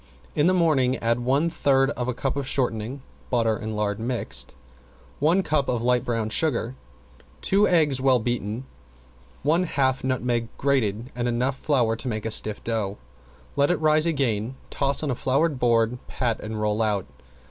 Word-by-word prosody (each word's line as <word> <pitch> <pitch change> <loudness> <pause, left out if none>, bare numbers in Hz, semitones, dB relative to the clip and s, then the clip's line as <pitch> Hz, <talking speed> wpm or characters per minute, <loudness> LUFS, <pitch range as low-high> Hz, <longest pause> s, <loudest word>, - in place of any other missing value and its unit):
In 150 +2 +2
the 185 - +4
morning 145 -7 +3
add 115 +1 0
one 135 +6 +1
third 135 -4 +2
of 125 -3 -3
a 125 - 0
cup 135 +2 -2
of 140 -2 -3
shortening 125 0 -2 0.3
(butter 115 -3 +2
and 110 0 -5
lard 105 -1 -1
mixed), 110 - -2 0.6
one 170 +6 +3
cup 145 -4 0
light 125 0 +1
brown 115 -2 -2
sugar, 130 -5 0 0.7
two 205 +2 +3
eggs 150 -7 +3
well 130 -1 +4
beaten, 120 0 -3 0.8
one 160 +5 +3
half 135 -6 0
nutmeg 125 -3 0
grated 125 -3 0
and 120 0 -1
enough 125 +3 0
flour 125 -6 +1
to 130 - -5
make 110 -3 -3
a 110 - -1
stiff 105 -1 +1
dough. 110 -3 -2 0.6
Let 140 0 +3
it 175 - +2
rise 155 +1 +4
again, 130 -6 0 0.2
toss 140 +1 +1
on 140 -4 0
floured 135 +4 0
board, 120 0 +2
pat 120 -4 -1
and 110 0 -5
roll 105 +1 0
out. 105 -3 0
125 Hz, 165 wpm, -24 LUFS, 115-140 Hz, 0.8 s, the